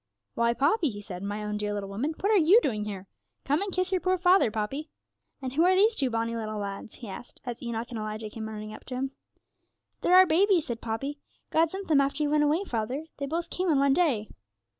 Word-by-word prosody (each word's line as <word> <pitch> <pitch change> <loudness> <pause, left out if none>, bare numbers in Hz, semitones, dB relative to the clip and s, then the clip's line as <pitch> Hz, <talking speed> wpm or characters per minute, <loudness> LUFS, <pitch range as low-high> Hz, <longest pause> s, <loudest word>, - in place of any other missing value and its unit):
'Why, 235 0 +1
Poppy,' 310 - +2
he 205 -3 -7
said, 190 -3 -8
'my 205 +1 -4
own 210 0 -2
dear 210 0 -2
little 200 -1 -4
woman, 265 +11 -2
what 405 - +2
are - - +5 0.2
you 440 - +9
doing 210 -5 -1
here? 195 -3 -6 0.4
Come 290 +5 +1
and 400 -1 -2
kiss 370 0 -1
your 370 -2 +1
poor 370 0 +2
father, 365 - +4
Poppy. 225 +9 -3 0.5
And 255 -1 -3
who 315 +4 +3
are 370 +1 +5
these 425 +4 +5
two 275 -11 +2
bonny 230 0 -1
little 215 -1 -4
lads?' 200 +1 -6
he 235 - -9
asked, 225 +5 -9
as 245 -1 -5
Enoch 235 0 -4
and 230 - -4
Elijah 215 0 -5
came 220 0 -6
running 215 0 -7
up - - -11
to 255 - -6
him. 265 +1 -2 0.9
'They're 360 - +4
our 375 0 +9
babies,' 365 0 +3
said 235 -2 -5
Poppy. 275 +6 -4 0.3
'God 325 0 +3
sent 385 +3 -6
them 295 -3 +5
after 280 +2 0
you 295 - 0
went 300 0 +4
away, 305 +6 +2
father; 250 - -3
they 280 - -3
both 330 +4 -3
came 365 0 -1
on 300 - +4
one 275 0 +4
day.' 270 -10 +1
265 Hz, 240 wpm, -28 LUFS, 215-330 Hz, 0.9 s, you